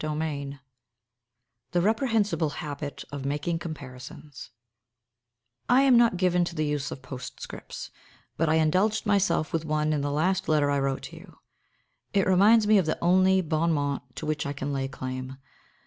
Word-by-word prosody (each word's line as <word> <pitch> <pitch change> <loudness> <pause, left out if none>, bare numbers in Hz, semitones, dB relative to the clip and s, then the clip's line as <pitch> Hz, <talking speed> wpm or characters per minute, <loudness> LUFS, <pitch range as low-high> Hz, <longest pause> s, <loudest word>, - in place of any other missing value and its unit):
XXXI 150 -2 -3 1.1
THE 175 - +3
REPREHENSIBLE 210 - +1
HABIT 145 -1 -6
OF 140 -2 -5
MAKING 145 +4 -2
COMPARISONS 145 -2 -9 1.2
I 260 +2 +5
am 265 -2 +5
not 235 -5 +4
given 180 -1 +2
to 170 - -6
the 155 -1 0
use 145 -1 -2
of 130 - -8
postscripts, 125 -2 -8 0.4
but 165 -1 +1
I 160 - +3
indulged 185 +8 +2
myself 195 -6 +1
with 165 -1 0
one 155 0 0
in 150 - 0
the 145 - -1
last 180 +6 0
letter 150 -2 +3
I 140 - +1
wrote 135 -1 -1
to - - -9
you. - - -15 0.8
It 195 -2 +3
reminds 205 +4 +5
me 210 -1 +5
of 175 - -1
the 155 - 0
only 185 +2 +4
bon 165 0 0
mot 140 -4 -3
to - - -6
which 150 -1 -2
I 140 - -3
can 140 0 -4
lay 135 -1 -1
claim. 130 0 -6
155 Hz, 165 wpm, -27 LUFS, 145-185 Hz, 1.2 s, I